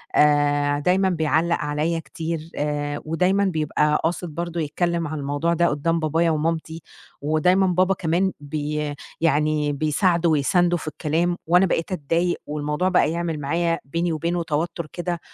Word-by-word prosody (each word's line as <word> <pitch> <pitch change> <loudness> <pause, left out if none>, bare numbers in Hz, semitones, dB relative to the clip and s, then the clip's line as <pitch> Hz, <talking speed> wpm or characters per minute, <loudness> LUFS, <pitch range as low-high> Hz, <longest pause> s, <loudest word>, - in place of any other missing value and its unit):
آآ، 145 -1 +3
دايمًا 185 +5 +2
بيعلّق 165 0 +1
عليّا 150 +3 -1
كتير 165 0 -5
آآ، 145 0 -2
ودايمًا 180 +5 +2
بيبقى 150 -3 +1
قاصد 170 +2 -1
برضه 170 0 -3
يتكلم 170 +2 -1
عن 155 0 -4
الموضوع 145 +4 0
ده 170 +1 +3
قدّام 165 +3 0
بابايا 165 +2 +1
ومامتي، 160 +1 -2 0.4
ودايمًا 170 +6 +3
بابا 185 +1 +2
كمان 180 +2 0
بي 150 0 -3 0.3
يعني 150 -1 +2
بيساعده 170 +4 +1
ويسانده 175 +4 +2
في 160 - -9
الكلام، 165 +3 -1
وأنا 180 +3 +5
بقيت 170 0 -1
أتضايق 170 +1 0
والموضوع 150 +4 -1
بقى 170 -5 +3
يعمل 170 -2 -2
معايا 165 +3 0
بيني 170 +5 -1
وبينه 170 +2 -1
توتر 165 +1 -2
كده 175 -1 -3
165 Hz, 145 wpm, -23 LUFS, 150-175 Hz, 0.4 s, وأنا